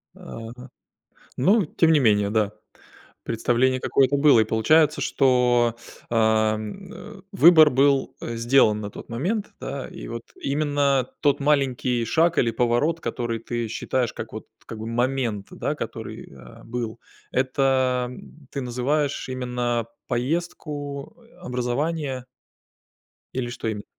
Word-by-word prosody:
Ага. 120 +3 -10 0.7
Ну, 195 - +4
тем 160 +2 +2
не 155 - +5
менее, 105 -5 +3
да, 105 -1 +1 0.7
представление 120 +3 +1
какое-то 135 +2 +2
было, 140 -5 +6
и - - +4
получается, 150 +8 +3
что, 125 -3 +3 0.3
ам, 110 -2 0
э, - - -11
выбор 160 +1 +7
был, 135 0 +2
э, 115 - -4
сделан 115 -3 +3
на 105 - -5
тот - - -10
момент, 190 - -2
да, 140 -2 -5
и - - -9
вот 115 0 -6 0.2
именно 140 -2 +1
тот 145 -1 +3
маленький 135 -4 +1
шаг 165 +9 +2
или 115 - +2
поворот, 120 +8 +1
который 120 -2 -3
ты 120 0 -3
считаешь 120 +2 -2
как - - -7
вот - - -8 0.2
как 110 - -8
бы 110 - -5
момент, 120 -4 -1
да, - - -3
который, - - -7
э, 65 -3 -14
был, 115 -1 -4 0.3
это 130 -1 +1 0.4
ты 140 - -4
называешь 135 +4 -1
именно 125 -2 -2 0.2
поездку, 145 +1 -3 0.2
образование? 135 -1 -2 1.1
Или 125 -2 -2
что 120 - -5
имен 105 -2 -3
125 Hz, 130 wpm, -24 LUFS, 115-140 Hz, 1.1 s, выбор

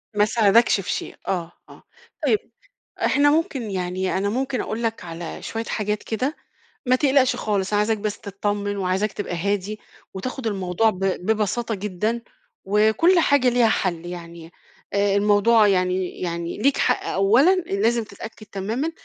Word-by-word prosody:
ما 210 0 +4
ساعدكش 220 -1 +4
في - - -4
شيء - - -4
آه، 175 -3 -2 0.2
آه، - - -15 0.4
طيب 430 - +3 0.7
إحنا 290 0 +4
ممكن 275 -8 -1
يعني 185 0 -2
أنا 200 +1 0
ممكن 255 +1 -1
أقول 225 +2 -4
لَك 225 -1 -2
على 165 0 -7
شوية 225 0 -4
حاجات 210 -1 -2
كده، 255 +8 -2 0.5
ما 255 - +4
تقلقش 270 -1 +3
خالص، 200 -2 -1
عايزاك 210 +1 +2
بس 210 0 -4
تطّمن، 205 0 -3
وعايزاك 195 +2 0
تبقى 180 -4 -4
هادي، 200 +3 -2 0.3
وتاخُد 255 +5 -5
الموضوع 195 +1 +1
ب 185 - -9
ببساطة 215 +4 0
جدًا، 210 +4 -2 0.4
وكُلّ 220 - +4
حاجة 285 -5 +3
ليها 240 -2 +4
حل 175 -5 -1
يعني، 170 -1 -9 0.4
آآ 200 0 +2
الموضوع 210 +2 +4
يعني 185 -1 0
يعني 170 -1 -3
ليك 275 +6 +2
حق - - +1
أولًا، 235 - +4
لازم 230 - 0
تتأكد 215 0 -10
تمامًا 220 +12 -3
210 Hz, 150 wpm, -23 LUFS, 190-235 Hz, 0.7 s, ما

